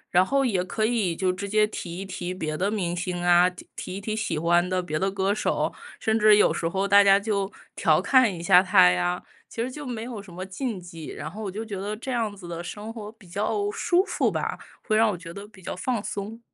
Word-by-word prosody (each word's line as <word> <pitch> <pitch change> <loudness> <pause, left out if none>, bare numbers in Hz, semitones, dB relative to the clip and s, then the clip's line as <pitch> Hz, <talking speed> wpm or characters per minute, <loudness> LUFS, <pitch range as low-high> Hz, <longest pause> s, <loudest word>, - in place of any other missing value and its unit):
然 180 +1 +6
后， 275 +5 +2
也 195 -7 +1
可 215 +4 -1
以 220 -7 +1
就 185 +2 0
直 200 +2 -5
接 215 +1 +3
提 175 -5 -6
一 195 - -5
提 180 -1 -5
别 155 -4 -3
的 195 +6 0
明 180 -5 -1
星 180 0 -3
啊、 175 0 +5
提 180 - -14 0.2
提 185 - -6
一 - - -4
提 215 +2 -3
喜 215 -8 -2
欢 175 +2 +3
的 185 0 0
别 155 -4 -3
的 195 +4 0
歌 195 +1 0
手， - - 0 0.3
甚 220 0 +1
至 215 -1 +6
有 - - +4
时 165 - -1
候 195 +3 -1
大 200 +1 +7
家 195 0 +6
就 200 -2 -1 0.2
调 - - +3
侃 255 -6 +4
一 170 - -7
下 180 +1 +6
他 185 - +6
呀。 90 0 0 0.3
其 230 - -4
实 245 - -1
就 290 +3 -8
没 235 -4 -4
有 235 -3 -6
什 195 -3 -14
么 185 +2 -6
禁 205 +2 -4
忌， 165 -3 -9
然 155 - -6
后 210 +6 -8
我 195 - -3
就 215 +4 -5
觉 210 -2 -5
得 205 +2 -3
这 260 +4 -5
样 225 -4 -1
子 185 -3 -11
的 170 0 -5
生 210 +5 -7
活 215 -2 -7
比 220 -4 -19
较 215 - -1
舒 365 -4 +2
服 - - 0
吧， - - -2 0.3
会 215 - +2
让 225 0 +5
我 195 - -2
觉 165 -1 -10
得 200 +2 -8
比 210 -3 -17
较 - - -5
放 230 +5 -1
松。 205 +2 -5
195 Hz, 275 characters per minute, -25 LUFS, 180-220 Hz, 0.3 s, 大